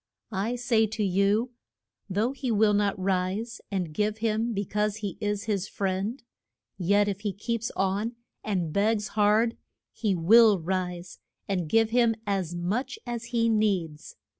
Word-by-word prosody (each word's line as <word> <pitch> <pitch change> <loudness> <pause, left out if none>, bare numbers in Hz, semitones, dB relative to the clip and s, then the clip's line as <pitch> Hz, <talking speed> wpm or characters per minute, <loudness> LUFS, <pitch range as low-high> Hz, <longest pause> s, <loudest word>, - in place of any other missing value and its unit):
I 210 +5 -1
say 235 -2 +2
to 215 0 -3
you, 200 +5 +2 0.6
though 210 +6 +1
he 265 -2 -4
will 215 -1 +3
not 205 -1 +1
rise 190 +4 -1
and 180 -6 -2
give 210 +4 0
him 225 +1 0
be 200 -2 -2
cause 210 +1 0
he 205 -5 -5
is 205 -1 -1
his 200 -3 -1
friend, 195 +6 -2 0.5
yet 200 +3 +2
if 200 -1 -2
he 205 -1 -2
keeps 230 +3 -3
on 200 +5 -1 0.3
and 180 -7 -1
begs 210 +1 +1
hard 215 +2 +2 0.3
he 210 -4 -1
will 210 +5 +6
rise 180 0 -3 0.3
and 180 -5 -1
give 225 +2 +3
him 235 -2 +3
as 190 -4 -1
much 200 - -2
as 240 -1 -4
he 235 -1 +1
needs. 195 -9 0
210 Hz, 155 wpm, -27 LUFS, 190-225 Hz, 0.6 s, will